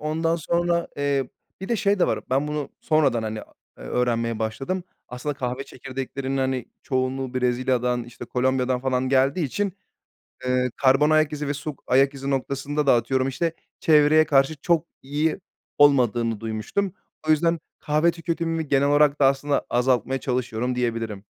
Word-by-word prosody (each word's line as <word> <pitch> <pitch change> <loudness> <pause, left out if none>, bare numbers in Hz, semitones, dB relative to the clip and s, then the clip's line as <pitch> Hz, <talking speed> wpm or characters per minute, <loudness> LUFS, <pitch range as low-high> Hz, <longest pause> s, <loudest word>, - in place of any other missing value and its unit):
Ondan 160 +2 0
sonra, 170 +1 0
eee, 140 -2 0 0.3
bir 190 - -6
de 235 - +1
şey 205 -1 +1
de - - +3
var, - - 0
ben 135 +3 +1
bunu 150 -1 -3
sonradan, 140 -7 +2
hani, 110 0 -4
aaa, - - -17 0.3
eee, - - -10
öğrenmeye 115 - 0
başladım. 135 +12 -3 0.3
Aslında 125 +4 -4
kahve 130 0 -3
çekirdeklerinin, 135 +1 -5
hani, 130 -2 0 0.2
çoğunluğu 130 -1 -2
Brezilya'dan, 125 -1 0
işte, 120 0 -10
Kolombiya'dan 130 0 0
falan 130 0 0
geldiği 135 +5 +2
için, 200 +8 -2 0.7
eee, 125 0 +1
karbon 135 +3 +4
ayak 155 -1 +3
izi 150 -1 -3
ve 145 - -1
su 150 0 -5
ayak 135 +2 +3
izi 135 0 -4
noktasında 140 +2 -1
da - - +6
atıyorum, 130 +2 +1
işte, 160 +5 -1 0.3
çevreye 155 0 +5
karşı 135 +2 +3
çok 165 +3 +1 0.2
iyi 150 +6 -1 0.4
olmadığını 120 -6 +3
duymuştum. 115 - -2 0.4
O - - +4
yüzden 165 +2 +3 0.2
kahve 155 +2 +2
tüketimimi 165 -1 -3
genel 140 0 +3
olarak 145 0 +3
da 135 - +6
aslında 140 +1 +1
azaltmaya 125 +1 +1
çalışıyorum 125 -1 -2
diyebilirim. 115 -4 -2
135 Hz, 155 wpm, -24 LUFS, 125-150 Hz, 0.7 s, da